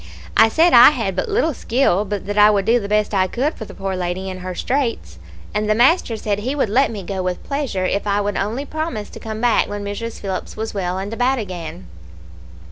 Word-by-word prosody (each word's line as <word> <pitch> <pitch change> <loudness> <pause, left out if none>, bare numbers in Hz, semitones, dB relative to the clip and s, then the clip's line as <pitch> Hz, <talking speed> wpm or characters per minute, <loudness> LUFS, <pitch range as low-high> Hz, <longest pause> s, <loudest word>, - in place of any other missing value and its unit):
I 225 - +6
said 330 +8 +3
I - - +10
had - - -2
but - - -2
little 405 -7 +1
skill, 230 -6 +1
but 205 -1 -4
that 205 +1 -3
I 210 0 +7
would 200 -2 +1
do 235 +3 +4
the 200 - -5
best 210 0 +1
I 190 -1 +2
could 265 - -1
for 220 - -8
the - - -12
poor 195 -1 -3
lady 185 +1 -3
in 185 - -7
her 185 0 -6
straits, 230 - -2 0.3
and 210 0 -1
the 215 - +3
master 245 -1 +3
said 205 -2 -2
he 255 +7 -2
would 270 -7 0
let 265 +6 +3
me 210 -4 -6
go 190 +1 -4
with 180 -1 -3
pleasure 275 -10 -2
if 200 +3 -1
I 200 0 +2
would 205 -1 -1
only 230 +8 -2
promise 310 -9 -4
to - - -10
come 220 -1 -6
back 240 -2 +3
when 205 0 -5
Mrs. 225 +3 -5
Phillips 190 0 -5
was 220 +1 -4
well 185 -2 -2
and 195 +3 -4
about 250 +3 +1
again. 175 - -6
210 Hz, 235 wpm, -20 LUFS, 195-245 Hz, 0.3 s, I